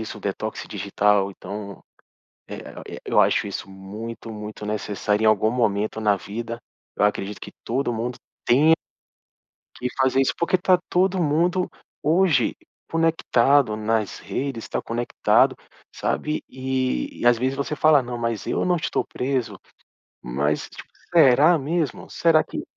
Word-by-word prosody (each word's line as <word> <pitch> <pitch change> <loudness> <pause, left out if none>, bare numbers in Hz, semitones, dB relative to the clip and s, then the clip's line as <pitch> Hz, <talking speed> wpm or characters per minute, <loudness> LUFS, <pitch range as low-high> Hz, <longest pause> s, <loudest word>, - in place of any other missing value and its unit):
isso 110 -1 -7
o - - -14
detox 105 +2 -4
digital. 100 0 +1
Então, 100 +1 -8 0.7
eh - - -6 0.3
eh, - - -7
eu - - +3
acho - - +3
isso 100 -1 -5
muito 105 +5 -8
muito 105 0 -7
necessário 105 0 -1
em - - +5
algum 110 0 +4
momento 110 -3 0
na 105 -2 +3
vida, 115 +4 -6 0.4
eu - - +2
acredito 105 0 -1
que - - -9
todo 125 +1 -1
mundo 120 +2 -3 0.3
tenha 150 +6 +6 1.0
que 125 - -3
fazer 130 0 +3
isso. 135 - +1
Porque 170 +2 +2
tá 185 0 +4
todo 185 +1 +2
mundo 175 +4 +1 0.3
hoje 160 -5 +3 0.3
conectado 145 -7 +3
nas 110 -1 -1
redes, 135 -5 -4
tá - - -2
conectado, 120 +1 +2 0.4
sabe 150 0 -2
e 130 - -2
e - - -2
às 120 -1 +6
vezes 130 +3 -1
você 140 +2 -2
fala: 150 -1 +5
"Não 120 0 -5
mas 115 -2 -3
eu - - 0
não 180 -1 +2
estou 160 - -1
preso." 130 -1 -2 0.6
Mas 70 +5 -1
tipo - - -12 0.2
será 155 +1 +6
mesmo? 155 0 -2
Será 165 -2 +3
que - - -6
120 Hz, 150 wpm, -23 LUFS, 105-145 Hz, 1.0 s, tenha